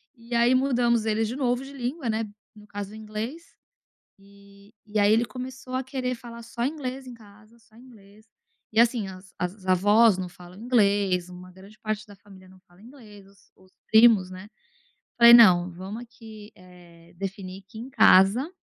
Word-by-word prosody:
E 235 +1 -12
aí 235 +2 +3
mudamos 240 -4 +1
ele 220 0 0
de 230 +3 -5
novo 250 -2 -1
de 280 - -12
língua, 255 0 -4
né, 220 +1 -1 0.3
no 210 0 -16
caso 205 -1 -7
o - - -10
inglês, 220 +8 -6 0.8
eh, 200 0 -20 0.2
e 210 0 -3
aí 205 +1 +4
ele 230 +2 +3
começou 255 0 -9
a 260 - -1
querer 255 -2 -4
falar 235 0 -11
só 235 +1 -5
inglês 265 -2 -5
em 245 - -10
casa, 215 +1 -19
só 225 -1 -26
inglês, 215 -4 -18 0.5
e 220 - -2
assim 235 -4 +1
as 185 0 -13
as 185 +2 -5
avós 205 +3 +4
não 180 -1 -4
falam 180 +1 -15
inglês, 200 -6 +1
uma 180 0 -12
grande 195 +3 -17
parte 215 0 -4
da 205 - -14
família 190 -2 -18
não 185 0 -19
fala 175 +2 -23
inglês, 220 -5 -15
os 195 -1 -25
os 185 0 -24 0.2
primos, 220 -5 +5
né. 185 +3 -11 0.7
Falei: 235 0 +9
"Não, 180 -6 +6
vamos 195 +7 -8
aqui 220 -3 -14
é 175 -2 -18
definir 195 0 -7
que 220 - -12
em 245 +4 -9
casa, 220 - +4
215 Hz, 180 wpm, -25 LUFS, 195-240 Hz, 0.8 s, Falei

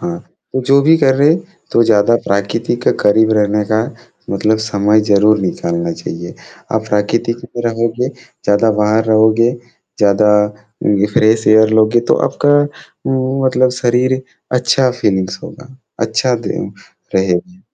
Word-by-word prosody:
हाँ, 175 0 -4 0.3
तो 130 - -1
जो 140 +1 +4
भी 160 +3 +5
कर 135 -3 +3
रहे 140 +2 +3
हैं, 170 - +1 0.3
तो 115 - +4
ज़्यादा 110 +1 +3
प्राकृतिक 115 +4 -1
करीब 110 +2 +3
रहने 105 0 +1
का 110 - +2 0.5
मतलब 110 0 0
समय 105 0 +2
ज़रूर 105 +1 +4
निकालना 85 -2 -3
चाहिए। 85 +1 -8 0.4
आप 110 0 -1
प्राकृतिक 105 +3 -1
में 120 0 -7
रहोगे, 115 +2 -1
ज़्यादा 115 -4 -1
बाहर 110 +1 +2
रहोगे, 110 +1 +3 0.5
ज़्यादा 105 0 +3 0.7
ये 105 - +3
फ्रेश 110 +1 +2
एयर 110 0 +5
लोगे, 110 +2 +3
तो 120 - +1
आपका 145 0 +2 0.5
उम, 130 +1 -1
मतलब 130 0 +2
शरीर 125 +2 +1 0.4
अच्छा 125 +1 +2
फ़ीलिंग्स 95 -4 -1
होगा, 130 +1 -12 0.2
अच्छा 115 +3 0
दिन - - -5 0.4
रहेगा। 95 - -1
110 Hz, 140 wpm, -15 LUFS, 105-125 Hz, 0.7 s, भी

